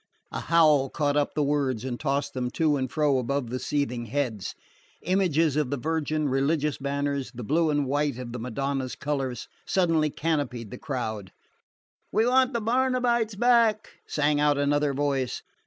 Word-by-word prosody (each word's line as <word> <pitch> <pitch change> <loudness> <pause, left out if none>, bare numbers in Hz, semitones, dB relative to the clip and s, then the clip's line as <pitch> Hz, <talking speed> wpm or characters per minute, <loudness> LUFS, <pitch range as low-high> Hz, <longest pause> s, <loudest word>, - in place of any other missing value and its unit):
A - - -3
howl 155 -5 +4
caught 145 -1 0
up 145 -1 0
the 150 - +2
words 140 -5 0
and 125 -2 -4
tossed 140 -1 -1
them 125 -1 -2
to 155 -2 +2
and 130 -2 -2
fro 150 -4 +2
above 130 -1 -2
the 130 - -2
seething 125 -5 -2
heads. 115 -5 -2 0.5
Images 165 -5 +2
of 150 -4 +1
the 140 - -1
Virgin, 155 +1 -1
religious 140 +2 0
banners, 140 0 -2
the 120 - -6
blue 160 +7 +2
and 145 -1 +1
white 145 -1 0
of 125 -2 -6
the 125 - -5
Madonna's 130 +2 -3
colours, 135 -4 -3 0.2
suddenly 165 -5 +2
canopied 140 -8 -2
the 125 - -8
crowd. 110 - -4 0.8
"We 220 +2 +3
want 255 +1 +3
the 235 - -1
Barnabites 240 -2 +1
back!" 230 -1 +3 0.2
sang 150 0 +1
out 145 -1 +3
another 145 0 +1
voice. 135 -3 -1
145 Hz, 165 wpm, -26 LUFS, 130-160 Hz, 0.8 s, howl